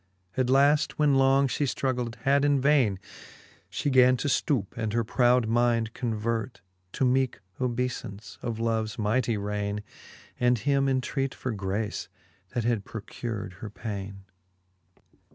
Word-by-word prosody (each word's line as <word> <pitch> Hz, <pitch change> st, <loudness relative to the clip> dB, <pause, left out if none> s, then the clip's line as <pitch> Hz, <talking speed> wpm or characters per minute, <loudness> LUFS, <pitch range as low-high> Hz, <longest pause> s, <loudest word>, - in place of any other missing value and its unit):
At 130 Hz, -1 st, +1 dB
laft 145 Hz, +3 st, +4 dB
when 150 Hz, -2 st, +4 dB
long 135 Hz, +1 st, +4 dB
fhe 130 Hz, -, -3 dB
ftruggled 125 Hz, -3 st, -1 dB
had 140 Hz, 0 st, +3 dB
in 145 Hz, -1 st, +3 dB
vaine, 130 Hz, -8 st, +3 dB, 0.7 s
She 145 Hz, -, -1 dB
gan 130 Hz, -1 st, +6 dB
to 135 Hz, -, -2 dB
ftoupe, 130 Hz, -, 0 dB
and 110 Hz, -2 st, -2 dB
her 115 Hz, 0 st, +2 dB
proud 120 Hz, +1 st, +3 dB
mind 115 Hz, -1 st, +2 dB
convert. 115 Hz, 0 st, -2 dB, 0.3 s
To 130 Hz, -, +1 dB
meeke 130 Hz, 0 st, +1 dB, 0.2 s
obeyfance 120 Hz, -4 st, -3 dB
of 115 Hz, -2 st, -3 dB
loves 110 Hz, -2 st, -1 dB
mightie 115 Hz, +1 st, +1 dB
raine. 105 Hz, 0 st, -3 dB, 0.6 s
And 125 Hz, 0 st, +3 dB
him 140 Hz, +3 st, +1 dB
entreat 135 Hz, +1 st, -1 dB
for 130 Hz, -, -3 dB
grace, 100 Hz, +1 st, -3 dB, 0.5 s
that 120 Hz, -, 0 dB
had 115 Hz, -3 st, 0 dB
procur'd 105 Hz, -2 st, -6 dB
her 110 Hz, -, -5 dB
paine. 100 Hz, -2 st, -6 dB
120 Hz, 135 wpm, -27 LUFS, 110-130 Hz, 0.7 s, gan